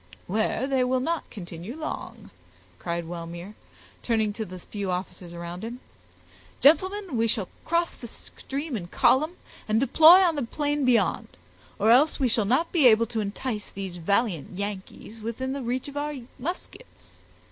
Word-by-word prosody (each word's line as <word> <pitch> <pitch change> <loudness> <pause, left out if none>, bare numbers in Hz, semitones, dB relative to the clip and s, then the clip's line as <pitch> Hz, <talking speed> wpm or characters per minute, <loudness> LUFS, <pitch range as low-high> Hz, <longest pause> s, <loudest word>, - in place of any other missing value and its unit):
"Where 220 +5 0
they 265 -2 +2
will 255 +1 +1
not 330 +5 -2
continue 175 +4 -8
long," 310 -1 -6 0.5
cried 170 -1 -3
Wellmere, 170 +3 -7 0.5
turning 220 -3 +1
to 220 +1 -4
the 185 -1 -9
few 200 +2 -5
officers 180 -1 -4
around 170 +2 -7
him. 235 +2 -6 0.8
"Gentlemen, 375 +2 +3
we 225 0 +2
will 195 -4 -3 0.2
cross 340 +1 +1
the 240 - -9
stream 275 +5 -6
in 180 -5 -4
column, 275 - +3 0.3
and 215 +1 +2
deploy 315 +8 +8
on 340 -3 +3
the 290 - -1
plain 290 +3 -1
beyond, 230 -8 +2 0.5
or 220 +3 +4
else 285 +7 +5
we 260 -3 +2
shall 220 -2 +1
not 260 +11 +1
be 310 -7 +6
able 230 0 +6
to 230 0 -3
entice 210 +1 -4
these 190 -2 -6
valiant 185 - 0
Yankees 205 +2 -6
within 245 +4 -3
the 280 - -4
reach 250 +2 -2
of 285 - -9
our 295 +1 -2 0.2
muskets. 350 - -8
230 Hz, 160 wpm, -26 LUFS, 195-280 Hz, 0.8 s, deploy